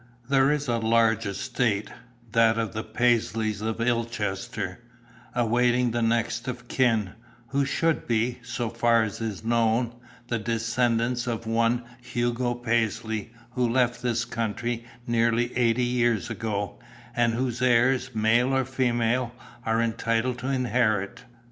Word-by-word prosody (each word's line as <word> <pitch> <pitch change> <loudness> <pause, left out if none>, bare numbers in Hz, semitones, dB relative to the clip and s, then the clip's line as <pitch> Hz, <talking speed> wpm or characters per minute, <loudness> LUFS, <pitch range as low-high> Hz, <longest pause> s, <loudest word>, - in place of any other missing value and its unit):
"There 135 0 +5
is 150 -1 -1
a 120 -1 +1
large 115 -1 +2
estate, 110 0 -1 0.4
that 115 0 +4
of 115 -1 -2
the 110 0 -3
Paisleys 110 -2 +1
of 110 0 -2
Illchester, 115 -5 -2 0.6
awaiting 120 +1 +2
the 120 +1 -1
next 115 +1 0
of 125 -1 -5
kin, 115 -8 +2 0.4
who 140 0 +1
should 165 +3 0
be, 120 +2 0
so 120 -1 -3
far 115 -1 +3
as 110 0 -5
is 110 -3 -4
known, 115 +1 +1 0.3
the 120 -1 -1
descendants 115 +2 0
of 115 -1 -3
one 115 +2 +1 0.2
Hugo 120 0 -1
Paisley 115 -2 -1 0.2
who 120 0 0
left 120 0 +1
this 120 -1 0
country 115 +1 -3 0.2
nearly 115 0 +1
eighty 120 0 +2
years 120 -4 +1
ago, 105 -3 -3 0.4
and 115 -1 +2
whose 125 0 -2
heirs, 125 +1 +3
male 120 +5 +3
or 130 - +1
female, 125 -1 0 0.3
are 115 +1 +2
entitled 115 +2 0
to 130 - -4
inherit. 120 -5 0
115 Hz, 135 wpm, -26 LUFS, 115-125 Hz, 0.6 s, There